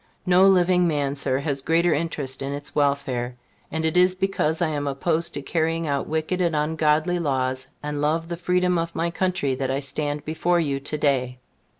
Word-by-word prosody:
No 185 +1 +5
living 180 -1 +4
man, 145 -3 0
Sir, 135 -2 0
has 140 -1 -2
greater 165 +3 +2
interest 145 -4 -2
in 135 +1 -3
its 145 +1 -7
welfare; 135 -4 0 0.4
and 160 0 -1
it 160 - 0
is 180 +1 +4
because 185 -5 0
I 175 -3 +1
am 145 -2 -2
opposed 160 +4 0
to 140 - -5
carrying 165 +2 0
out 140 -2 -1
wicked 160 +4 -1
and 170 -3 +1
ungodly 155 +3 +1
laws, 130 -4 -1 0.2
and 150 -1 -3
love 160 +3 0
the 170 - -3
freedom 180 0 +1
of 165 0 -3
my 170 +1 0
country, 180 -7 0
that 130 0 -2
I 135 +1 0
stand 145 +1 -3
before 170 +3 +1
you 140 -4 -1
to 145 +2 -3
day. 130 -4 0
155 Hz, 195 wpm, -24 LUFS, 140-170 Hz, 0.4 s, No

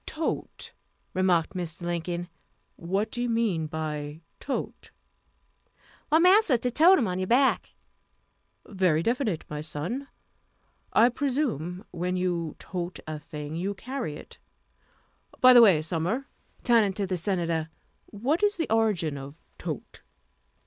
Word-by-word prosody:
"Tote," 320 0 -4 0.4
remarked 180 -3 +2
Mr. 175 -2 -5
Lincoln; 175 0 -3 0.5
"what 195 +5 -2
do 240 - -3
you 245 - 0
mean 215 -9 0
by 150 -1 -5 0.2
tote?" 275 - -5 1.2
"Why, 310 - +5
massa, 365 - +5
to 245 +2 -1
tote 340 +9 +6
um 235 - +1
on 180 0 -2
your 185 - -2
back." 260 +4 +2 0.9
"Very 180 -5 +1
definite, 230 - -1
my 150 0 -5
son; 165 - -4 0.8
I 235 +3 +5
presume 240 - -2
when 180 +1 -2
you 175 -3 -1
tote 180 -1 -5
a 155 -1 -5
thing, 150 0 -7
you 190 +5 -2
carry 245 - -5
it. - - -12 1.0
By 255 0 +8
the 240 - +9
way, 185 -9 +6
Sumner," 175 - -2 0.4
turning 225 -5 +4
to 200 +1 -2
the 185 -1 -2
Senator, 170 -3 -1 0.4
"what 260 - -1
is 415 -1 +2
the 330 - -2
origin 195 -10 +1
of 135 +2 -9 0.2
tote?" - - -6
185 Hz, 135 wpm, -27 LUFS, 165-240 Hz, 1.2 s, the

